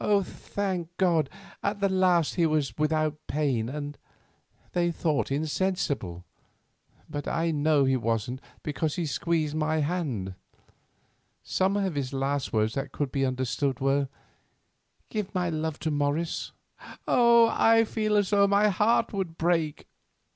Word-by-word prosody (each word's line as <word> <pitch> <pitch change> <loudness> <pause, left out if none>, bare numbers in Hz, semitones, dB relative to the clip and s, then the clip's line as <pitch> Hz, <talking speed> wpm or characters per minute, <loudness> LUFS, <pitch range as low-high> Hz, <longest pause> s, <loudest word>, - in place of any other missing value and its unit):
Thank 180 -3 -4
God, 165 -7 +2 0.3
at 200 0 -1
the 200 - +3
last 185 -4 +3
he 170 -2 +2
was 150 -7 0
without 155 0 0
pain 135 -7 0
and, 145 +1 -6 0.7
they 175 -1 +1
thought, 155 -3 0
insensible; 145 - -1 0.8
but 145 - -5
I 165 0 0
know 150 -2 +3
he 130 0 +3
wasn't, 115 +2 -1 0.2
because 155 0 -2
he 175 - -1
squeezed 155 0 0
my 155 0 0
hand. 145 - -2 1.1
Some 190 +2 +1
of 195 -3 0
his 140 -2 -3
last 135 0 -1
words 110 0 +1
that 135 0 -3
could 140 -2 -2
be 135 -1 +1
understood 130 +1 -1
were, 135 0 +1 1.0
'Give 210 -3 -4
my 180 -2 0
love 160 -1 -2
to 160 - -1
Morris.' 145 +3 -1 0.6
Oh! 235 -1 +5
I 225 0 +5
feel 215 -1 0
as 205 -1 +1
though 200 -1 +5
my 200 +1 +4
heart 220 +4 +2
would 185 -5 -3
break. 165 -3 0
155 Hz, 140 wpm, -27 LUFS, 140-185 Hz, 1.1 s, Oh